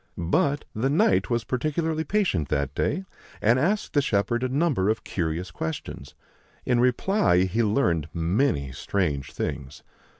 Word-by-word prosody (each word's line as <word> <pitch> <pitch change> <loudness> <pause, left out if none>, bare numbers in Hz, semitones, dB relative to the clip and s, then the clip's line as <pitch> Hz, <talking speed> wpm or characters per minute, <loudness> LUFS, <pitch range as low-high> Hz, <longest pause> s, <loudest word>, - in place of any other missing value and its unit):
But 140 - +1
the 120 +5 0
Knight 95 - +2
was 120 -2 0
particularly 155 +6 -1
patient 160 - 0
that 70 -1 -1
day, 190 - -1 0.3
and 120 +4 +3
asked 195 +9 0
the 145 - +4
shepherd 120 -1 0
a 130 - 0
number 135 - +1
of 110 - -1
curious 85 +1 -3
questions. 80 -2 -6 0.5
In 125 -1 +2
reply 125 - +3
he 95 +5 0
learned 95 - +1
many 85 - 0
strange 70 -4 -2
things. 70 0 -5
110 Hz, 140 wpm, -25 LUFS, 85-140 Hz, 0.5 s, the